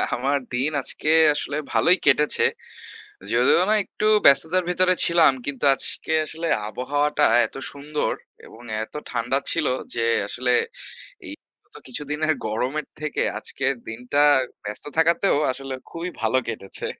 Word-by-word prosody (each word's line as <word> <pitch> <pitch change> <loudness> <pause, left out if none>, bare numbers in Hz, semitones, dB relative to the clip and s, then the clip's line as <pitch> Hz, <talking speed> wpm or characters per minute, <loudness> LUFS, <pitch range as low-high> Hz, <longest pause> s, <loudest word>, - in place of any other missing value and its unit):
আমার 135 +3 0 0.2
দিন 130 +5 0
আজকে 150 - 0 0.3
আসলে 145 0 -3 0.2
ভালোই 180 +3 +4
কেটেছে। 150 - +4 0.9
যদিও 465 - +3
না - - +4
একটু - - -7 0.2
ব্যস্ততার 160 +6 +4
ভিতরে 185 +1 +2
ছিলাম 170 -4 +4
কিন্তু, 145 -1 -4
আজকে 160 - -2
আসলে 165 +2 -5 0.2
আবহাওয়াটা 145 +6 -1 0.2
এত - - -17 0.2
সুন্দর 145 +1 -3 0.3
এবং 115 - -15 0.2
এতো 110 - -7
ঠান্ডা 125 +2 -1
ছিল 165 -3 0 0.3
যে 115 -1 0 0.2
আসলে, 125 +3 0 0.7
এই - - -6 0.3
গত - - -30
কিছুদিনের 150 +4 -2
গরমের 130 +7 -3
থেকে 155 -1 -2 0.2
আজকের 135 0 -2 0.2
দিনটা 125 +6 -1 0.4
ব্যস্ত 105 0 -5
থাকাতেও 170 +3 +2 0.2
আসলে, 135 0 -6 0.2
খুবই 170 +2 -6
ভালো 110 +3 +1
কেটেছে। 100 -4 -3
145 Hz, 130 wpm, -22 LUFS, 125-160 Hz, 0.9 s, ভালোই